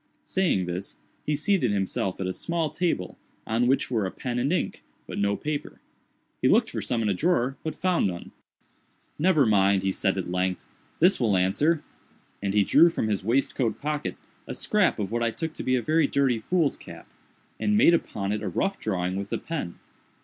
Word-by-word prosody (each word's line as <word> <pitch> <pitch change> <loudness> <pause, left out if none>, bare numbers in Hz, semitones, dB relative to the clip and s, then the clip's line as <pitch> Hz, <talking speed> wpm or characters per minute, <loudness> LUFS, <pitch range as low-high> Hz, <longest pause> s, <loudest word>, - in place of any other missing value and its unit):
Saying 175 - +1
this, 90 +3 -5 0.3
he 150 - +2
seated 155 - +1
himself 95 -1 -1
at 95 - -2
a 95 - -2
small 165 - -2
table, 170 - -2 0.3
on 115 +2 +1
which 135 0 +1
were 110 -5 +1
a - - -3
pen 125 +4 -4
and 135 +5 0
ink, 180 - -1 0.2
but - - -6
no 100 0 +1
paper. 150 +3 -4 0.6
He - - +3
looked - - +3
for - - -3
some 115 -2 -1
in 105 - +1
a - - +2
drawer, 135 - +1
but 160 - -3
found 180 - +1
none. 85 -2 -6 0.9
"Never 160 -4 +4
mind," 100 -3 +3
said 95 0 0
he 95 - -1
at 90 - -7
length, 90 0 -1 0.3
"this 180 +4 +5
will 110 -6 +2
answer;" 145 - +2 0.6
and 100 0 -1
he 105 - +5
drew 160 - +6
from 110 -9 -2
his 100 -3 -1
waistcoat 120 0 0
pocket 150 0 -3 0.3
a - - -4
scrap 210 -3 +2
of 100 -2 -3
what 120 +1 -1
I 115 - +2
took 160 +7 -4
to - - -6
be 130 0 +2
very 155 +3 +2
dirty 135 -4 +1
foolscap, 165 +4 -2 0.5
and 210 0 +2
made 190 -5 +6
upon 100 -11 -1
it 105 0 -2
a 105 - -3
rough 195 - -1
drawing 90 -3 -2
with 100 0 -4
the - - -1
pen. 150 - -5
120 Hz, 195 wpm, -26 LUFS, 100-160 Hz, 0.9 s, drew